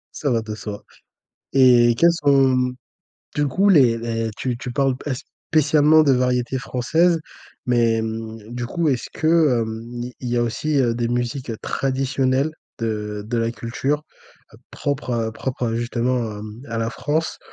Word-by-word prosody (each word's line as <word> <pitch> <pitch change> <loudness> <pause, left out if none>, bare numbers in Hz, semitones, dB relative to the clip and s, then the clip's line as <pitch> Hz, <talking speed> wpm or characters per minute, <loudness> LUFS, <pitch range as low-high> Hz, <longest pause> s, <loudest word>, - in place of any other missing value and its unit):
Ça 145 - -1
va 115 -2 +1
de 110 -1 -6
soi 105 -1 -7 0.7
et 125 -3 +6
quels 170 0 +6
sont, 135 -5 +3 0.7
du 145 0 +2
coup, 190 +9 +2
les 135 -11 +5
les 115 -1 -2
tu 125 -2 -2
tu 125 - -5
parles 135 0 +1
pas 145 - -4 0.4
spécialement 155 0 +5
de 145 - +3
variétés 125 0 +1
françaises, 160 +7 +1 0.4
mais 115 -2 +2
mmh, 110 0 -6
du 120 -1 -3
coup, 165 +6 0
est-ce 130 -4 -1
que, 155 -6 +3
hem, 115 +2 -6 0.2
il 125 - -5
y 120 - 0
a 120 - +3
aussi, 140 +5 -1
heu, 120 -3 +2
des 120 0 -1
musiques 120 +1 -2
traditionnelles 135 +1 0 0.3
de 105 -2 -3
de 120 +1 -1
la 115 0 0
culture 130 +6 -2 0.7
propre 140 -3 -2
à 115 -1 -1
propre 125 +1 -3
à 115 - -2
justement 120 +1 0
à 105 0 -7
mmh, 110 +2 -9
à 115 0 -3
la 115 0 -1
France? 155 +6 -2
125 Hz, 165 wpm, -22 LUFS, 115-140 Hz, 0.7 s, et